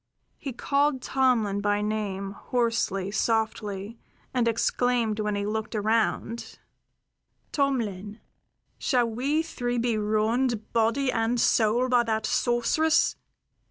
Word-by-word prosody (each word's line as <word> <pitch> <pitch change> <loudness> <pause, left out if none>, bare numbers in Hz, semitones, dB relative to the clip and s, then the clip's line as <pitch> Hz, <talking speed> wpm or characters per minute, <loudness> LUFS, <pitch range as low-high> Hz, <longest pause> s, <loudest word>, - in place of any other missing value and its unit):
He 275 - -5
called 280 +2 0
Tomlin 230 -7 +1
by 205 0 +1
name 200 -2 -2
hoarsely, 210 -4 -1
softly, 220 -1 -1 0.3
and 245 -2 +1
exclaimed 230 -1 +1
when 210 -1 -1
he 200 0 -2
looked 220 +2 -3
around: 225 +2 -1 0.9
"Tomlin, 220 -7 -1 0.6
shall 245 -3 +2
we 275 +8 0
three 245 -6 -3
be 235 -2 0
ruined 220 +2 0
body 235 +4 +2
and 225 +2 0
soul 230 +3 +3
by 250 -1 +4
that 220 -2 -1
sorceress? 245 +7 +2
230 Hz, 110 wpm, -26 LUFS, 210-245 Hz, 0.9 s, by